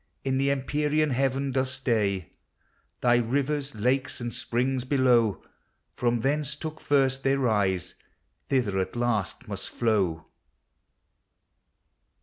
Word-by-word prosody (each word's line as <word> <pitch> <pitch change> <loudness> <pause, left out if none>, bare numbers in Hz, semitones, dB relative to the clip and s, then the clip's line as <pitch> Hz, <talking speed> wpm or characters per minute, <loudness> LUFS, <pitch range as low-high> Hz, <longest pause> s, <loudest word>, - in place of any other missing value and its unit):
In 130 -1 0
the 140 +1 +2
empyrean 150 +2 +1
heaven 135 +1 0
docs 130 0 0
stay. 110 - -1 0.7
Thy 120 -1 +4
rivers, 140 +3 -1
lakes, 130 +7 0
and 120 -1 -4
springs, 125 +2 -1
below, 125 -5 +2 0.5
From 120 -1 0
thence 145 +2 0
took 155 +1 -7
first 135 -2 +2
their 135 0 +2
rise, 100 -8 +1 0.6
thither 115 -8 +1
at 95 +2 -3
last 120 -1 -1
must 100 -2 -6
How. 95 -9 +1
130 Hz, 115 wpm, -27 LUFS, 110-135 Hz, 0.7 s, Thy